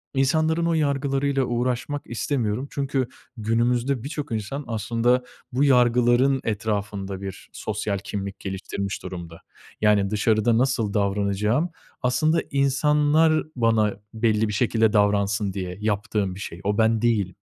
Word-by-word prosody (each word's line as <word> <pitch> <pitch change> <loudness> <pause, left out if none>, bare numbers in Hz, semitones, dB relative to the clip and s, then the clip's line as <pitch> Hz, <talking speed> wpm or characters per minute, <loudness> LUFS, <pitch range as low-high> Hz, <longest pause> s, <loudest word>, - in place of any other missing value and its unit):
insanların 160 +5 +2
o 170 - +2
yargılarıyla 140 -2 +1
uğraşmak 125 +4 -1
istemiyorum. 120 0 -2
Çünkü 135 -2 -1 0.3
günümüzde 120 +3 0
birçok 145 -2 -5
insan 110 +7 -3
aslında 115 +3 +1 0.3
bu 130 +4 +1
yargıların 125 0 +4
etrafında 100 -2 -3
bir 95 -1 -8
sosyal 105 -1 -3
kimlik 100 0 -5
geliştirmiş 95 0 -4
durumda. 85 -2 -8 0.4
Yani, 105 -2 +3
dışarıda 110 +2 +2
nasıl 120 -5 +1
davranacağım, 105 - +1 0.3
aslında 155 +6 +2
insanlar 150 +3 +3
bana 115 -4 +2 0.2
belli 110 -1 +1
bir 105 - -3
şekilde 110 0 +2
davransın 100 -1 +2
diye 90 -1 -5
yaptığım 105 -2 -1
bir 95 - -9
şey. 85 -3 -7
O, 105 0 0
ben 110 0 +3
değilim. 105 -6 +1
115 Hz, 125 wpm, -24 LUFS, 105-135 Hz, 0.4 s, yargıların